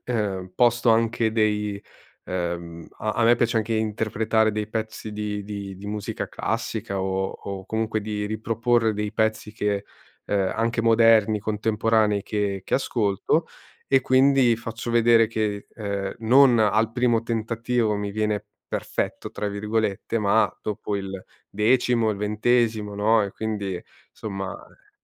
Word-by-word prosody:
uhm, 100 -6 -2
posto 120 -1 +3
anche 115 0 +2
dei 105 -2 0 0.4
uhm, 85 -2 -4
a 110 - -1
a 115 - +2
me 120 +1 +6
piace 120 -1 0
anche 110 +1 0
interpretare 110 0 +1
dei 105 0 -3
pezzi 110 0 -4
di 105 -1 -3
di 100 -2 -6
di 100 - -10
musica 105 -1 -4
classica 100 -1 -3
o 95 0 -1
o 95 -1 -7
comunque 110 0 -1
di 105 0 -3
riproporre 115 +1 +1
dei 105 +1 -3
pezzi 110 -1 0
che, 105 -2 -1 0.4
uhm, 100 -2 0
anche 115 +1 0
moderni, 115 -2 +4
contemporanei 105 0 +1
che 100 -3 -2
che - - -1
ascolto, 115 - +1 0.4
e 135 - +4
quindi 130 -2 +4
faccio 115 +1 -5
vedere 115 -1 +5
che, 105 -2 -2
ehm, 100 -3 -3
non 120 +1 +5
al 110 +1 +2
primo 120 -2 +1
tentativo 115 0 0
mi 100 -1 -3
viene 105 -1 -1 0.2
"perfetto", - - -3
tra 105 - -3
virgolette, 105 +1 -2
ma 105 +2 +3
dopo 105 0 -3
il 95 -1 -5 0.3
decimo, 115 +1 +2
il 105 - -3
ventesimo, 105 0 +1
no; 110 +2 +3
e 100 - -6
quindi 100 -4 -3 0.3
somma 95 -3 -5
e - - -17
110 Hz, 140 wpm, -24 LUFS, 100-115 Hz, 0.4 s, me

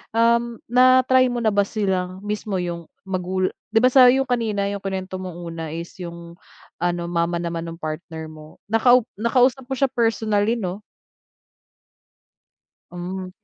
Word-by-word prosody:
um, 235 +1 +3 0.2
na-try 255 +1 +5
mo 245 -1 -2
na 220 - +3
ba 200 -1 +2
silang 190 -3 -2
mismo 210 -1 -3
yung 170 -2 -3 0.2
magula 185 0 -1 0.2
di 225 - +5
ba 255 - +5
sa 255 -1 +8
yung 265 +2 +4
kanina 225 -5 -1
yung 200 - -4
kuwinento 190 -1 -4
mong 180 -2 -7
una 165 -1 -6
is 170 +1 -6
yung 170 -1 -8 0.5
ano 175 -1 0
mama 170 0 0
naman 170 0 -4
ng 165 0 -7
partner 155 0 -6
mo. 155 0 -13 0.2
Nakau 245 +2 +5 0.2
nakausap 250 +3 +2
mo 265 - -2
siya 265 0 +1
personally 225 -3 +1
'no? 190 -4 -4 2.1
Hmm. 185 +1 -5
195 Hz, 145 wpm, -22 LUFS, 175-235 Hz, 2.1 s, sa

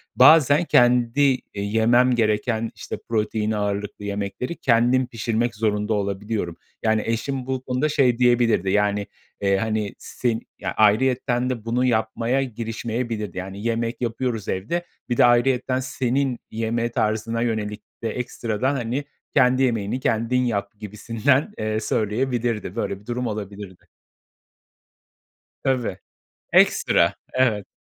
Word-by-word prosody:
Bazen 155 0 +6
kendi 125 +2 +4 0.2
e, 100 - -4
yemem 115 +5 +3
gereken, 110 0 0
işte, - - -6
protein 110 -1 0
ağırlıklı 105 0 -3
yemekleri 100 - -3
kendim 125 +1 +2
pişirmek 115 0 -1
zorunda 105 0 0
olabiliyorum. 100 -3 -2 0.3
Yani, 110 -1 +2
eşim 125 +3 -2
bu 130 -1 -2
konuda 130 +4 0
şey 125 -5 +3
diyebilirdi, 120 -5 +3
yani, 105 0 +1 0.3
eee, 100 -1 +2
hani 110 -1 -1
sen 115 -3 -2 0.2
Ya, - - -3
ayrıyeten 125 +3 +2
de 115 -4 -4
bunu 125 +2 +1
yapmaya 115 +3 +1
girişmeyebilirdi. 115 -3 -4
Yani 95 +2 -6
yemek 115 +1 -2
yapıyoruz 115 -2 -2
evde. 170 - -2 0.2
Bir 120 - 0
de - - +7
ayrıyeten 125 +1 +2
senin 130 0 -1
yeme 115 +1 -1
tarzına 110 +2 -1
yönelik 110 -3 -2 0.2
de 115 - 0
ekstradan, 125 +2 -2
hani, 125 +2 -2 0.3
kendi 130 -1 +4
yemeğini 115 -1 0
kendin 115 +1 +1
yap 105 -3 -2
gibisinden, 115 - 0
eee, 110 0 -1
söyleyebilirdi. 115 -1 -1
Böyle 100 -4 -2
bir 105 - -21
durum 120 +1 -2
olabilirdi. 100 -3 -7 1.8
Tabii. 125 -8 0 0.6
Ekstra! - - +4 0.2
Evet. 115 -6 +1
115 Hz, 125 wpm, -23 LUFS, 105-125 Hz, 1.8 s, de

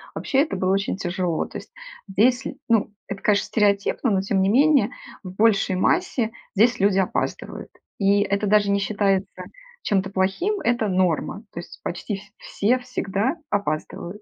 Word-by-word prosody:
вообще 270 - 0
это 295 -10 -1
было 185 +1 +1
очень 195 -1 -1
тяжело. 180 -3 -1
То - - -8
есть, - - -15 0.4
здесь, 245 +6 +2
ль - - -7
ну, 220 -2 +2 0.2
это, 195 0 -6
конечно, 205 -1 +2
стереотипно, 210 +3 +1
но, 190 -1 +2
тем 195 -1 0
не 190 - +2
менее, 285 +5 +4 0.3
в 185 - -7
большей 200 -2 +2
массе 235 - +1 0.2
здесь 230 +3 +3
люди 195 0 +3
опаздывают, 185 - -3 0.3
и 200 +1 +3
это 200 +1 0
даже 205 0 +3
не 200 - +2
считается 195 -2 -1 0.4
чем-то 195 -1 0
плохим, 200 - 0
это 235 -2 +1
норма. 185 +3 0
То 170 - -5
есть, 175 - -11
почти 190 +4 -4
ф 195 - -8 0.2
все 245 +5 0
всегда 245 - -2 0.2
опаздывают. 200 +1 -3
200 Hz, 165 wpm, -23 LUFS, 190-225 Hz, 0.4 s, менее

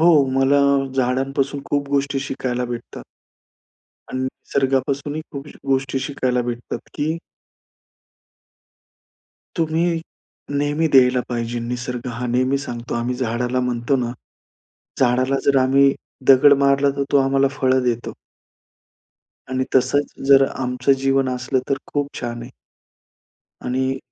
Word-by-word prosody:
हो, 170 - +6 0.3
मला 135 +1 +3 0.4
झाडांपासून 135 +2 0
खूप 145 -1 -1
गोष्टी 140 0 0
शिकायला 130 -2 -3
भेटतात 120 -1 -7 1.1
आणि 130 - -3
निसर्गापासूनही 135 +3 -1
खूप 140 0 -7 0.2
गोष्टी 135 0 0
शिकायला 130 -3 -1
भेटतात, 120 0 -4
की 155 +3 -1 2.4
तुम्ही 165 +1 +1 0.6
नेहमी 145 +3 +1
द्यायला 125 -1 +5
पाहिजे. 120 0 -3
निसर्ग 125 +1 -4
हा 125 - -2
नेहमी 130 +3 +1
सांगतो, 120 -4 -6
आम्ही 120 +1 -1
झाडाला 125 +1 -1
म्हणतो 120 +3 0
ना, 120 -1 -2 0.9
झाडाला 130 +1 +2
जर 140 -1 +4
आम्ही 135 +1 +4 0.3
दगड 140 +2 +7
मारला 140 +1 +3
तर 140 - +1
तो 140 - +5
आम्हाला 135 0 +3
फळं 130 -1 +2
देतो. 120 -1 -2 1.4
आणि 130 0 0
तसंच, 135 +3 +2 0.2
जर 135 -1 +7
आमचं 130 +1 +1
जीवन 135 -1 +2
असलं, 130 +1 -1
तर 140 - +1 0.2
खूप 145 -1 0
छान 120 -1 -4
आहे. 120 - -10 1.1
आणि 130 +1 -1
130 Hz, 115 wpm, -21 LUFS, 125-140 Hz, 2.4 s, दगड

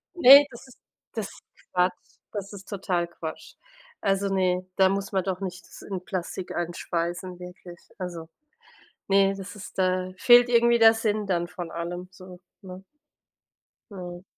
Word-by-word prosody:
Das - - -11
ist - - -4
ne, 280 +3 +11
das 235 +3 -12
ist 255 - -17 0.4
das - - -3
ist - - -16 0.3
Quatsch. 180 0 -1 0.2
Das 205 0 -5
ist 195 -1 -11
total 180 -4 -1
Quatsch. 160 -2 -8 0.5
Also 195 0 +1
ne, 185 -1 +1
da 190 -1 +5
muss 195 0 -2
man 190 -2 0
doch 190 0 -3
nicht 180 -2 -6
das - - -14
in 185 -3 -6
Plastik 185 0 -5
einschweißen, 175 +1 -3
wirklich. 180 -1 -11 0.2
Also 170 -3 -6 0.8
ne, 195 0 +4
das 195 +2 -8
ist 200 - -11
da 185 0 +1
fehlt 245 +2 +7
irgendwie 235 0 +4
der 225 0 +8
Sinn 215 -2 -1
dann 175 -2 0
von 175 -2 -7
allem 175 +2 -5
so, 185 -1 -13 0.2
ne? 185 0 -10 1.1
Mhm. 180 -2 -8
185 Hz, 165 wpm, -26 LUFS, 180-200 Hz, 1.1 s, ne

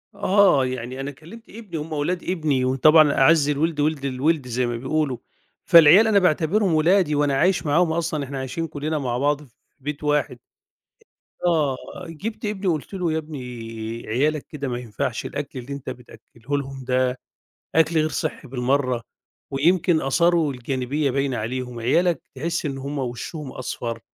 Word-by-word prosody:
آه، 200 -9 +4
يعني 130 +1 -5
أنا 140 +1 -4
كلّمت 175 - -14
ابني، 205 -7 -8
هُم 155 +1 -6
ولاد 170 +4 -1
ابني 155 -8 0
وطبعًا 150 +3 +5
"أعَز 150 +1 +4
الوِلد 150 +1 0
وِلد 145 -2 0
الوِلد" 135 +1 0
زي 125 +1 0
ما 120 -1 -2
بيقولوا، 135 0 -1 0.5
فالعيال 170 +6 +8
أنا 205 -2 +5
باعتبِرهم 180 +2 +2
ولادي 160 0 +3
وأنا 145 -1 +2
عايش 180 +3 +2
معاهم 160 +3 +3
أصلًا، 160 -3 -1
إحنا 135 0 -5
عايشين 160 +5 -3
كلّنا 155 +1 -3
مع 125 -4 -2
بعض 145 +2 +1
في 135 - -18 0.3
بيت 145 +2 -5
واحد. 150 -4 0 1.1
آه 150 -6 +2 0.3
جِبت 215 +7 -6
ابني 205 -2 -3
وقُلت 160 +3 -1
له: 180 -4 -1
"يا - - 0
ابني 155 -3 -6 0.7
عيالك 145 +6 0
كده 140 -3 -5
ما 120 -1 -2
ينفَعش 115 -4 -3
الأكْل 130 - -5
اللي 135 +3 -7
أنت 140 - -6
بتأكّله 120 +3 -7
لهم 135 -1 -6
ده 125 0 +1 0.6
أكْل 160 +1 +3
غير 155 0 +2
صِحّي 150 - -4
بالمرّة 130 -1 0 0.5
ويمكن 170 +3 +2
آثاره 170 +3 +2
الجانبية 130 +3 -2
باينة 135 -1 -1
عليهم، 125 +2 -4
عيالك 165 +7 +2
تحس 165 +4 -2
إن 135 -2 -3
هُم 140 +1 -4
وشّهم 130 +3 -5
أصفر، 115 -2 -5
145 Hz, 160 wpm, -23 LUFS, 130-165 Hz, 1.1 s, فالعيال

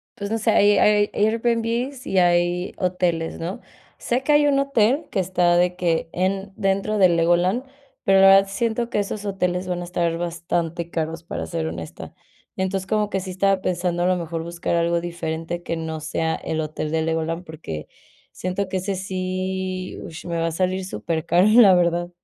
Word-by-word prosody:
pues, 200 +1 -5
no 225 - +1
sé, 220 +1 +1
ai 205 -1 +5
air 210 0 +4
Airbnb 230 +4 0
y 195 - -1
hay 175 0 +2
hoteles, 180 -3 -1
¿no? 170 +4 -5 0.4
Sé 245 +2 0
que 295 - +1
hay 295 0 +5
un 275 -1 +3
hotel 275 +2 +2
que - - 0
está 175 -1 +2
de 180 0 +2
que 165 -2 0
en 195 +2 -1
dentro 195 +2 0
de 190 -2 +6
Legoland, 175 +7 +2 0.4
pero 195 0 +4
la 195 - +8
verdad 195 0 +7
siento 230 +2 -1
que 210 - 0
esos 205 +1 -3
hoteles 180 -2 -1
van 180 -1 -2
a - - -5
estar 170 -1 -1
bastante 170 0 -3
caros, 165 0 -3
para 125 - -5
ser 80 0 -3
honesta. 80 0 -7 0.4
Entonces, 190 0 -1
como 210 0 +1
que 195 -2 -2
sí 185 - -7
estaba 195 +1 +1
pensando, 175 -1 -1
a - - +2
lo 185 0 +2
mejor 165 -1 -4
buscar 170 0 -2
algo 170 0 +2
diferente 170 0 -4
que 165 - -3
no 160 -1 -4
sea 160 +2 -1
el 160 - -4
hotel 155 0 -3
de 160 0 +1
Legoland, 165 +2 -2
porque 150 - -7 0.5
siento 185 +2 -3
que 190 - -2
ese 195 +2 -2
sí, 185 0 -3
ush, 160 - -9
me 170 -1 -3
va 165 - 0
a - - -2
salir 185 +3 -1
supercaro, 170 +1 +1
la 215 -3 +7
verdad. 175 0 +1
180 Hz, 190 wpm, -22 LUFS, 170-195 Hz, 0.5 s, la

